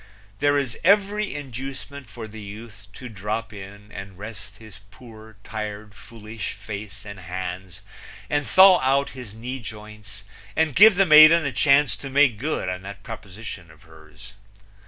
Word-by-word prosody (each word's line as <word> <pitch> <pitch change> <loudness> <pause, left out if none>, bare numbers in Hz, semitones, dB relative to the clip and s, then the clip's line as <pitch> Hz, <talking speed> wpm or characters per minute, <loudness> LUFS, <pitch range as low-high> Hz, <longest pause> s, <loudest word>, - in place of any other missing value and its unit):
There 145 0 +3
is 135 -4 -3
every 205 +2 +2
inducement 135 -1 -8
for 110 +1 -8
the 110 0 -11
youth 105 0 -11
to 125 - -9
drop 110 +1 -5
in 100 +1 -11
and 95 -1 -9
rest 105 0 -10
his 110 -4 -14
poor, 110 -1 -15
tired, 105 -1 -6
foolish 110 -1 -8
face 105 -1 -9
and 100 -2 -9
hands 90 +1 -7 0.5
and 145 -1 -1
thaw 190 -1 +7
out 135 +2 +1
his 125 -5 -10
knee 125 +4 -6
joints 105 -3 -11 0.3
and 160 -3 +1
give 210 +5 +7
the 195 +1 +4
maiden 155 +1 +8
a 140 - -1
chance 145 +2 +3
to 135 - -8
make 135 -5 +3
good 150 -3 -2
on 90 0 -4
that 100 +1 -10
proposition 105 -4 -9
of 80 +3 -19
hers. 80 +5 -16
110 Hz, 155 wpm, -23 LUFS, 100-140 Hz, 0.5 s, maiden